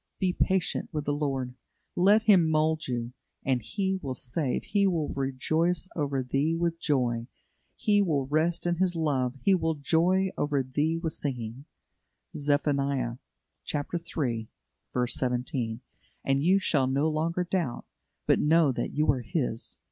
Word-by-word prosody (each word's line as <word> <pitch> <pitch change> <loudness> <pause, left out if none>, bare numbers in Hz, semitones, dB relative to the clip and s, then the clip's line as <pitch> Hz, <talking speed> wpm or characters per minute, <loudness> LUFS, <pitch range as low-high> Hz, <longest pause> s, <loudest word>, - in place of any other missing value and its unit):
Be 185 -1 +1
patient 190 -1 0
with 150 -3 -3
the 145 - 0
Lord. 135 -4 -2 0.4
Let 205 +5 +5
Him 190 -7 +5
mould 155 0 +1
you, 120 -1 -3 0.3
and 130 -2 +1
"He 190 - -2
will 130 -3 -4
save, 130 +3 -1
He 200 -1 +2
will 165 -5 0
rejoice 155 +6 0
over 140 -4 -1
thee 140 +6 0
with 165 0 -1
joy; 120 -7 0 0.5
He 205 -1 +3
will 150 -8 +1
rest 155 +5 +1
in 175 -1 +1
His 180 -1 +1
love, 135 -6 0
He 195 - +5
will 160 -3 +1
joy 175 +6 +2
over 145 -2 +1
thee 150 +5 0
with 165 -1 -3
singing" 125 -1 -4 0.7
(Zeph. 145 0 +1
iii. 135 -4 0 1.9
17); 125 -1 -1 0.4
and 135 0 +2
you 185 +4 +5
shall 150 -8 +1
no 140 +4 +1
longer 165 +3 0
doubt, 175 -8 -2 0.4
but - - +3
know 160 -1 +4
that - - -3
you 150 +1 +1
are 130 -2 -2
His. 120 -2 -2
150 Hz, 145 wpm, -28 LUFS, 130-170 Hz, 1.9 s, Let